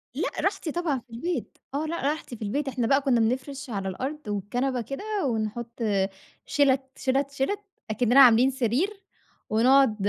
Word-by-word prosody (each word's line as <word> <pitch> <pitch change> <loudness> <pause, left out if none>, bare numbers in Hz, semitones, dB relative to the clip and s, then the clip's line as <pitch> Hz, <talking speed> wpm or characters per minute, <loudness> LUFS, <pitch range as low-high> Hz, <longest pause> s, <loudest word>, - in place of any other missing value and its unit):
لأ - - 0
راحتي 390 -5 -1
طبعًا 320 -6 -1
في 245 - -25
البيت، 340 +10 -3 0.2
آه، 300 +3 -1
لأ 335 +2 -3
راحتي 300 -5 -4
في 220 - -16
البيت، 270 +8 -2
إحنا 250 -3 -1
بقى 275 +1 +4
كنا 265 -4 +2
بنفرش 260 +4 -1
على 195 -3 -2
الأرض، 270 +10 -4
والكنبة 245 +6 -1
كده 275 - -6 0.2
ونحط 235 0 -3 0.7
شِلَت، 275 -2 +3 0.2
شِلَت، 275 +1 0
شِلَت، 280 +9 -1 0.3
أكننا 245 +4 +4
عاملين 250 0 +7
سرير، 285 - -1 0.5
ونقعد 245 +1 +5
265 Hz, 155 wpm, -26 LUFS, 235-285 Hz, 0.7 s, عاملين